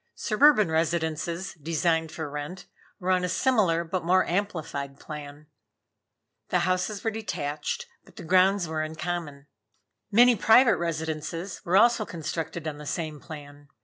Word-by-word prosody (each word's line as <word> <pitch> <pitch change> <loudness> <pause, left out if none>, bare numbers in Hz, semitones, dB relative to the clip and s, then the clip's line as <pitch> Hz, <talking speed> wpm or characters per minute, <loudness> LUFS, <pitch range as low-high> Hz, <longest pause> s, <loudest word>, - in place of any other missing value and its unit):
Suburban 215 - +4
residences, 165 +2 -1
designed 160 +1 0
for 160 -2 -5
rent, 150 +5 -6 0.3
were 185 0 -1
on 185 -1 +2
a 180 - -1
similar 195 -9 +2
but 175 +1 -3
more 185 +2 +3
amplified 160 -7 -3
plan. 150 -1 -9 1.0
The 180 - +2
houses 185 +3 -1
were 225 - 0
detached, 170 - -3 0.2
but - - -20
the 190 - -9
grounds 185 +1 +3
were 155 0 -2
in 155 +1 -4
common. 160 -4 -4 0.7
Many 240 +3 +6
private 230 +3 +5
residences 160 +2 -4
were 180 +3 +3
also 235 +1 +5
constructed 165 -2 -5
on 150 -1 -5
the 150 - -9
same 155 -2 -3
plan. 145 -2 -11
170 Hz, 145 wpm, -27 LUFS, 155-190 Hz, 1.0 s, Many